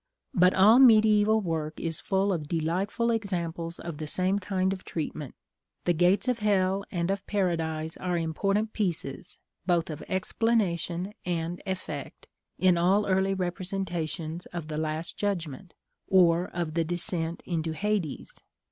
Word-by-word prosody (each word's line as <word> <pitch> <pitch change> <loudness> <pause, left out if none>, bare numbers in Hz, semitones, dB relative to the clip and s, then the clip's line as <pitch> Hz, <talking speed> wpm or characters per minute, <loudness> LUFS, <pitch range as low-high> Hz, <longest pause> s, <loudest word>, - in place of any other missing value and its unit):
But 180 0 +4
all 215 +6 +7
mediæval 220 -3 +6
work 160 -3 -3
is 165 -1 -1
full 195 0 +1
of 155 -4 -3
delightful 180 +9 0
examples 175 -6 -2
of 170 -3 -7
the 155 - -4
same 185 +5 +2
kind 190 -1 0
of 190 - -8
treatment: 150 -4 -5 0.5
the 175 - +2
gates 180 +7 +3
of 250 -2 +1
hell 195 -2 +2
and 175 0 -1
of 195 0 -2
paradise 165 -5 -1
are 180 -1 -1
important 195 +7 0
pieces, 170 -9 -2 0.3
both 170 -2 +1
of 150 - -7
explanation 185 -3 0
and 175 0 -2
effect, 190 -1 -5 0.3
in 180 -2 +4
all 195 +4 +3
early 190 0 +2
representations 175 -3 -3
of 170 -3 -6
the 150 - -3
last 155 +1 -3
judgment, 175 -4 -3 0.3
or 175 -2 +4
of 170 -3 -4
the 165 0 +1
descent 170 0 -1
into 165 -2 -2
Hades. 195 -4 -2
180 Hz, 140 wpm, -28 LUFS, 165-195 Hz, 0.5 s, all